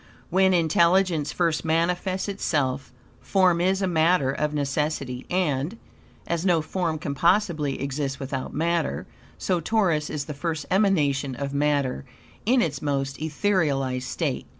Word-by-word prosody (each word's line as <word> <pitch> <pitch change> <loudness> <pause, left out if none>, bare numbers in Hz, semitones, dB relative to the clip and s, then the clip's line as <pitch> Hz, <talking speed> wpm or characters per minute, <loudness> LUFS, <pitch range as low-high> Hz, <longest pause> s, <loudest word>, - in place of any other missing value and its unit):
When 190 +1 +4
intelligence 170 -1 +3
first 170 -3 0
manifests 175 +4 0
itself 145 -9 -1 0.3
form 185 -3 +3
is 190 +2 +1
a - - +2
matter 160 -4 +3
of 150 +2 -1
necessity, 140 -3 -2
and, 175 +1 0 0.5
as 170 0 -2
no 175 -4 +2
form 165 -1 -2
can 145 -2 -4
possibly 170 -2 +1
exist 140 0 -3
without 135 -1 -4
matter, 165 - -1 0.3
so 175 - 0
Taurus 170 -5 +1
is 145 -2 -3
the 150 - -5
first 155 +1 -3
emanation 150 -9 +2
of 140 +1 -4
matter 140 - 0 0.4
in 250 +1 +4
its 140 -5 -3
most 135 -2 -2
etherealized 150 -6 0
state. - - -2
155 Hz, 135 wpm, -25 LUFS, 140-180 Hz, 0.5 s, When